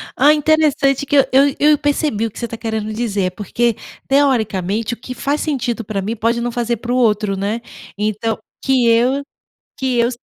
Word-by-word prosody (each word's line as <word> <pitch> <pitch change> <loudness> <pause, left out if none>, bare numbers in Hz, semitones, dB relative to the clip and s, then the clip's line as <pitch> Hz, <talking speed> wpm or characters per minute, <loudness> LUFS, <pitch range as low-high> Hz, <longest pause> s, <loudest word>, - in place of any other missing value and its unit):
Ah! 290 +4 +5
Interessante 295 -3 +2
que 285 - 0
eu 275 - +6
eu 275 +1 +4
eu 300 +1 +5
percebi 290 -6 0
o 225 - -4
que - - -10
você 235 - -2
está 230 0 -7
querendo 220 -1 -3
dizer, 205 -5 -1
porque 230 +4 -1 0.3
teoricamente 225 -6 +1
o - - -6
que 255 +2 -8
faz 280 +4 -2
sentido 245 -6 -2
para 200 -1 -3
mim 215 +4 -3
pode 230 +2 0
não 240 0 -2
fazer 235 0 -1
para 235 +2 -5
o - - +1
outro, 210 -4 +2
né? 210 +4 -2 0.4
Então, 215 +1 -1 0.3
que 260 -3 +2
eu 245 +5 +3 0.6
que 260 -3 0
eu. 235 0 +3
235 Hz, 195 wpm, -18 LUFS, 215-270 Hz, 0.6 s, eu